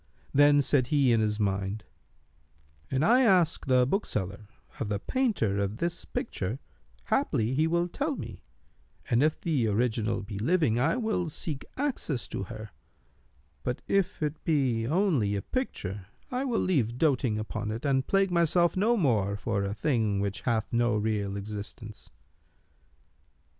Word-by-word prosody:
Then 145 Hz, 0 st, +6 dB
said 130 Hz, -2 st, +2 dB
he 140 Hz, -3 st, +3 dB
in 115 Hz, -, +3 dB
his 105 Hz, 0 st, 0 dB
mind, 100 Hz, +1 st, -1 dB, 1.1 s
"An 135 Hz, +2 st, +1 dB
I 245 Hz, +9 st, +5 dB
ask 180 Hz, -, +3 dB
the 125 Hz, -1 st, +4 dB
bookseller 105 Hz, -, -2 dB, 0.3 s
of 115 Hz, -6 st, -2 dB
the 105 Hz, -, 0 dB
painter 115 Hz, -, 0 dB
of 100 Hz, +2 st, -2 dB
this 170 Hz, +4 st, -2 dB
picture, 105 Hz, +7 st, -3 dB, 0.5 s
haply 110 Hz, +3 st, +1 dB
he 155 Hz, +4 st, +2 dB
will 170 Hz, +1 st, +1 dB
tell 285 Hz, -, -2 dB
me; -, -, -8 dB, 0.7 s
and 120 Hz, +1 st, +4 dB
if 155 Hz, +1 st, +2 dB
the 145 Hz, -9 st, 0 dB
original 110 Hz, 0 st, 0 dB
be 100 Hz, -1 st, -6 dB
living, 135 Hz, -, +2 dB
I 155 Hz, -, +2 dB
will 220 Hz, -8 st, -1 dB
seek 150 Hz, -2 st, -5 dB
access 255 Hz, -, -2 dB
to 95 Hz, -, -4 dB
her; 110 Hz, +1 st, -8 dB, 0.9 s
but, 125 Hz, -, -3 dB
if 190 Hz, -4 st, 0 dB
it 150 Hz, +1 st, -3 dB
be 130 Hz, -8 st, +1 dB
only 150 Hz, -, +2 dB
a 100 Hz, -, -3 dB
picture, 100 Hz, -, -4 dB, 0.2 s
I 255 Hz, +2 st, -1 dB
will 240 Hz, -4 st, 0 dB
leave 125 Hz, -10 st, +1 dB
doting 130 Hz, -7 st, +2 dB
upon 110 Hz, 0 st, -4 dB
it 115 Hz, +6 st, -4 dB
and 135 Hz, -2 st, +1 dB
plague 195 Hz, -1 st, +2 dB
myself 170 Hz, 0 st, +3 dB
no 220 Hz, +5 st, +3 dB
more 110 Hz, -, +1 dB
for 100 Hz, -2 st, -1 dB
a 100 Hz, +1 st, -3 dB
thing 110 Hz, -4 st, +1 dB
which 100 Hz, 0 st, -2 dB
hath 115 Hz, -3 st, -1 dB
no 120 Hz, -1 st, +2 dB
real 105 Hz, -2 st, -1 dB
existence." 105 Hz, +1 st, -7 dB
125 Hz, 155 wpm, -28 LUFS, 105-165 Hz, 1.1 s, Then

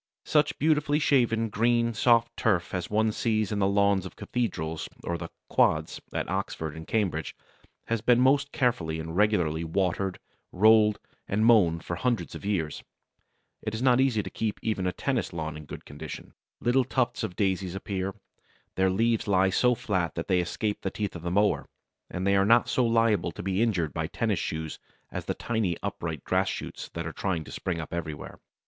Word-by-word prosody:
Such 150 Hz, -1 st, +2 dB
beautifully 150 Hz, -1 st, +2 dB
shaven, 120 Hz, -7 st, +2 dB
green, 115 Hz, +2 st, +2 dB
soft 115 Hz, +1 st, +3 dB
turf 95 Hz, -6 st, +1 dB
as 90 Hz, -2 st, -2 dB
one 110 Hz, +1 st, +2 dB
sees 110 Hz, -2 st, 0 dB
in 105 Hz, -, -1 dB
the 95 Hz, -, +3 dB
lawns 100 Hz, -1 st, +3 dB
of 95 Hz, -, -9 dB
cathedrals 80 Hz, -10 st, -3 dB
or 85 Hz, -, -2 dB
the 85 Hz, 0 st, -6 dB, 0.2 s
"quads" 80 Hz, 0 st, +2 dB
at -, -, -2 dB
Oxford 80 Hz, -2 st, -3 dB
and 80 Hz, 0 st, -9 dB
Cambridge 90 Hz, -9 st, -1 dB, 0.5 s
has 115 Hz, -2 st, -1 dB
been 120 Hz, +1 st, +4 dB
most 140 Hz, +2 st, +3 dB
carefully 85 Hz, -11 st, 0 dB
and 80 Hz, +1 st, -5 dB
regularly 90 Hz, -6 st, +2 dB
watered, 90 Hz, +2 st, -1 dB, 0.3 s
rolled, 105 Hz, +1 st, +5 dB, 0.3 s
and 105 Hz, +3 st, +1 dB
mown 95 Hz, -8 st, +5 dB
for 85 Hz, -, -4 dB
hundreds 120 Hz, +4 st, -1 dB
of -, -, -8 dB
years. 95 Hz, -7 st, -1 dB, 0.8 s
It 110 Hz, 0 st, -3 dB
is 110 Hz, -, -4 dB
not 130 Hz, -1 st, +5 dB
easy 120 Hz, -6 st, +2 dB
to -, -, -6 dB
keep 110 Hz, -2 st, -2 dB
even 100 Hz, -4 st, 0 dB
a -, -, +1 dB
tennis 125 Hz, -1 st, -2 dB
lawn 80 Hz, -2 st, -4 dB
in 75 Hz, 0 st, -9 dB
good -, -, -9 dB
condition. 70 Hz, -, -8 dB, 0.3 s
Little 125 Hz, +2 st, +3 dB
tufts 130 Hz, -1 st, 0 dB
of 100 Hz, -5 st, -4 dB
daisies 95 Hz, -2 st, 0 dB
appear. 95 Hz, 0 st, -3 dB, 0.6 s
Their 95 Hz, 0 st, +3 dB
leaves 115 Hz, +4 st, +1 dB
lie 95 Hz, -1 st, +3 dB
so 125 Hz, +5 st, +3 dB
flat 90 Hz, -9 st, -1 dB
that -, -, -4 dB
they 90 Hz, -, +3 dB
escape 105 Hz, +4 st, -2 dB
the 95 Hz, -, -1 dB
teeth 105 Hz, -1 st, -4 dB
of 85 Hz, -, -6 dB
the 85 Hz, -, -3 dB
mower, 100 Hz, +3 st, +2 dB, 0.4 s
and 90 Hz, +1 st, -3 dB
they 100 Hz, 0 st, +3 dB
are 95 Hz, -, +4 dB
not 115 Hz, +4 st, +5 dB
so 125 Hz, -2 st, +2 dB
liable 115 Hz, -5 st, +2 dB
to -, -, -7 dB
be 95 Hz, +2 st, 0 dB
injured 90 Hz, -10 st, +1 dB
by -, -, -2 dB
tennis -, -, -1 dB
shoes 80 Hz, 0 st, -4 dB, 0.3 s
as -, -, -5 dB
the -, -, -2 dB
tiny 110 Hz, -7 st, -1 dB
upright 85 Hz, -7 st, -4 dB
grass -, -, +1 dB
shoots -, -, -6 dB
which 85 Hz, -1 st, -5 dB
are 80 Hz, -, -5 dB
trying 90 Hz, -5 st, -2 dB
to -, -, -12 dB
spring 90 Hz, -3 st, -3 dB
up 80 Hz, -, -6 dB
everywhere. 80 Hz, -3 st, -5 dB
100 Hz, 190 wpm, -27 LUFS, 85-115 Hz, 0.8 s, rolled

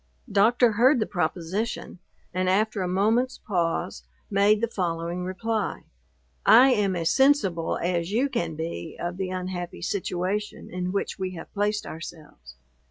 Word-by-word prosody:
Doctor 225 Hz, +4 st, +4 dB
heard 245 Hz, +5 st, +4 dB
the 215 Hz, -, +1 dB
proposition, 180 Hz, +4 st, -3 dB, 0.3 s
and 185 Hz, 0 st, 0 dB
after 210 Hz, +2 st, +1 dB
a 180 Hz, -, -1 dB
moment's 220 Hz, +8 st, +1 dB
pause, 170 Hz, -, -2 dB, 0.3 s
made 205 Hz, +1 st, +4 dB
the 230 Hz, -, +1 dB
following 175 Hz, -3 st, -2 dB
reply: 205 Hz, +3 st, -2 dB, 0.6 s
"I 255 Hz, +4 st, +8 dB
am 205 Hz, -6 st, +2 dB
as 165 Hz, -2 st, +1 dB
sensible 265 Hz, -, +3 dB
as 175 Hz, 0 st, -1 dB
you 245 Hz, +6 st, +2 dB
can 170 Hz, -, -2 dB
be 160 Hz, -, -5 dB
of 175 Hz, +1 st, -3 dB
the 190 Hz, -1 st, -2 dB
unhappy 180 Hz, -1 st, -5 dB
situation 195 Hz, +2 st, -3 dB
in 180 Hz, 0 st, -3 dB
which 200 Hz, 0 st, -2 dB
we 185 Hz, -1 st, -3 dB
have 165 Hz, -, -10 dB
placed 210 Hz, +1 st, 0 dB
ourselves. 150 Hz, -, -10 dB
185 Hz, 145 wpm, -26 LUFS, 175-215 Hz, 0.6 s, I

